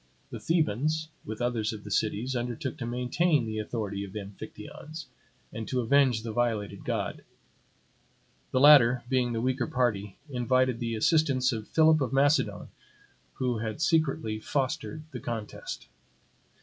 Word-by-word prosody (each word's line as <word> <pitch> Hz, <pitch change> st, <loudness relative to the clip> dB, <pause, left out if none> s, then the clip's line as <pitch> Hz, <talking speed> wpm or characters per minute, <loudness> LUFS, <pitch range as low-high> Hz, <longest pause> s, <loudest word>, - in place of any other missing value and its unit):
The -, -, -6 dB
Thebans, 155 Hz, 0 st, 0 dB, 0.2 s
with 110 Hz, +2 st, -4 dB
others 115 Hz, -3 st, 0 dB
of 105 Hz, -2 st, -8 dB
the 105 Hz, -, -8 dB
cities, 110 Hz, +5 st, 0 dB
undertook 120 Hz, +1 st, -3 dB
to 115 Hz, -, -3 dB
maintain 125 Hz, +4 st, +1 dB
the 110 Hz, -1 st, -3 dB
authority 105 Hz, -2 st, -3 dB
of 95 Hz, -1 st, -9 dB
the 105 Hz, -, -4 dB
Amphictyons, 145 Hz, -, -9 dB, 0.5 s
and 110 Hz, -1 st, -5 dB
to 130 Hz, -, -1 dB
avenge 125 Hz, -2 st, +3 dB
the 115 Hz, -, -4 dB
violated 110 Hz, -4 st, -1 dB
god. -, -, -3 dB, 1.3 s
The 130 Hz, -, +1 dB
latter, 130 Hz, -4 st, +7 dB
being 125 Hz, -2 st, +1 dB
the 115 Hz, -1 st, -1 dB
weaker 130 Hz, -1 st, 0 dB
party, 105 Hz, -6 st, -1 dB
invited 130 Hz, -2 st, +1 dB
the 115 Hz, -2 st, -2 dB
assistance 135 Hz, +1 st, +3 dB
of 110 Hz, -3 st, -4 dB
Philip 160 Hz, -1 st, +4 dB
of 130 Hz, -2 st, -1 dB
Macedon, 145 Hz, +3 st, +2 dB, 0.7 s
who 125 Hz, -3 st, -1 dB
had 110 Hz, +2 st, -4 dB
secretly 140 Hz, -10 st, +1 dB
fostered 135 Hz, +2 st, -2 dB
the 125 Hz, -, -6 dB
contest. 115 Hz, -3 st, -6 dB
120 Hz, 145 wpm, -28 LUFS, 110-135 Hz, 1.3 s, latter